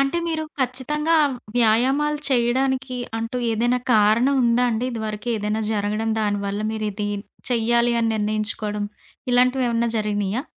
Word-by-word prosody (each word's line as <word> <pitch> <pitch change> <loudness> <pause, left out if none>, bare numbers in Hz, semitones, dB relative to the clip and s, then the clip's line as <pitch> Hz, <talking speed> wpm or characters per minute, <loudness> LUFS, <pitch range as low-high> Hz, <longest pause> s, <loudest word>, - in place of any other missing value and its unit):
అంటే 275 +5 +1
మీరు 315 -1 -2 0.2
ఖచ్చితంగా 300 +6 0 0.4
వ్యాయామాలు 260 +6 +2
చేయడానికి 260 +1 +1 0.2
అంటూ 230 +2 -4
ఏదైనా 240 +3 +1 0.2
కారణం 220 +6 +4
ఉందా 235 +1 +3
అండి? 230 +1 -1
ఇదివరకేదైనా 215 -1 -2
జరగడం, 210 +1 -1
దానివల్ల 205 -1 -1
మీరిది 210 -1 -3 0.4
చెయ్యాలి 235 0 +2
అని 230 - +1
నిర్ణయించుకోడం 215 0 -2 0.5
ఇలాంటివేవన్నా 245 -2 +2
జరిగినీయా? 210 +1 -1
230 Hz, 110 wpm, -22 LUFS, 215-255 Hz, 0.5 s, కారణం